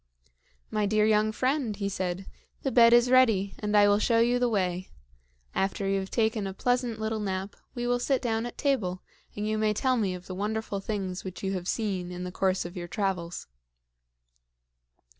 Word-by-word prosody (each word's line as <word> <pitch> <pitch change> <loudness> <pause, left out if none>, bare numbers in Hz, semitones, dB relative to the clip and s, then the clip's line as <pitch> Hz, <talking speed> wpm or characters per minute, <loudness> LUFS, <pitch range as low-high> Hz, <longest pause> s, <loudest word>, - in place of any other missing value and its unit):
"My 210 -1 +1
dear 215 +1 +3
young 215 0 +3
friend," 255 -1 0
he 200 -1 -2
said, 185 -1 -3 0.4
"the 270 - 0
bed 235 -2 +7
is 240 +1 +5
ready, 220 -7 +4
and 210 0 +1
I 205 0 +7
will 205 0 +4
show 230 +1 +2
you 240 +2 +3
the 245 -1 +2
way. 185 -3 -1 0.6
After 195 0 -1
you 195 0 +1
have 190 0 -5
taken 220 -3 0
a 190 - -6
pleasant 245 -1 0
little 220 0 -2
nap, 195 -1 -3 0.2
we 240 -1 -3
will 245 0 +1
sit 265 +1 +1
down 230 -1 -1
at 240 - -10
table, 205 -11 0 0.3
and 210 +1 -2
you 215 0 0
may 215 -1 +1
tell 255 +3 +1
me 195 -5 0
of 180 0 -10
the 185 - -6
wonderful 210 +1 -2
things 195 -3 -4
which 190 0 -7
you 195 0 -1
have 180 -2 -4
seen 190 -6 -2
in 180 0 -5
the 180 - -5
course 185 0 0
of 175 +2 -7
your 175 -1 -5
travels." 180 -3 -2
210 Hz, 195 wpm, -28 LUFS, 190-230 Hz, 0.6 s, bed